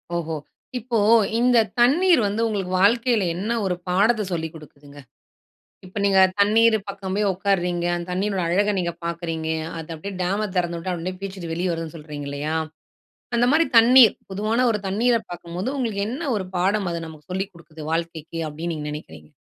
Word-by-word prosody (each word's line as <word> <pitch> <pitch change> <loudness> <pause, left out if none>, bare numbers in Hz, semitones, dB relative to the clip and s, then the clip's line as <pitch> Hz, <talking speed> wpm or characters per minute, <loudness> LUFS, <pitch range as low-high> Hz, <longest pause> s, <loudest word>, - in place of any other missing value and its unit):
ஓஹோ! 165 -1 -2 0.4
இப்போ 240 0 -2 0.4
இந்த 245 0 +4 0.2
தண்ணீர் 315 +4 +5
வந்து 210 +3 -1
உங்களுக்கு 195 -4 -3
வாழ்க்கைல 230 0 +3
என்ன 205 +6 -3
ஒரு 180 -1 0
பாடத்த 215 +5 +3
சொல்லிக் 160 -2 -3
குடுக்குதுங்க? 145 -1 -14 0.9
இப்ப 185 - -17
நீங்க 195 -1 +5 0.2
தண்ணீர் 220 +2 +5
பக்கம் 195 -1 -5
போய் 210 -1 +2
ஒட்காருறீங்க, 180 -2 0
அந்த 175 0 -4
தண்ணீரினோட 195 0 -1
அழக 205 +4 +2
நீங்க 170 -1 -1
பாக்குறீங்க, 165 -1 -3 0.3
அது 165 +1 -7
அப்டியே 195 +5 -7
டேம 200 +4 0
திறந்துவிட்டா 175 0 -1
அப்டியே 180 +2 -4
பீச்சுக்ட்டு 190 -4 -6
வெளிய 175 +1 -1
வருதுன்னு 165 0 -5
சொல்றீங்க 150 -2 -7
இல்லயா? 150 +3 -2 0.8
அந்த 240 +1 +3
மாரி 325 +2 +4
தண்ணீர் 235 0 +8 0.2
பொதுவான 220 +5 +1
ஒரு 210 - -1
தண்ணீர 230 +5 +2 0.2
பாக்கும்போது, 175 +6 -5
உங்களுக்கு 220 -6 -1
என்ன 285 +4 -3
ஒரு 190 -3 -2
பாடம் 195 +1 +1
அது 170 - -3
நமக்கு 155 +2 -14
சொல்லிக் 190 +1 -3
குடுக்குது 160 -2 -12
வாழ்க்கைக்கி, 165 -1 -4
அப்டின்னு 165 +3 -4
நீங்க 150 -1 -5
நினைக்கிறீங்க? 80 - -10
185 Hz, 160 wpm, -23 LUFS, 165-215 Hz, 0.9 s, தண்ணீர்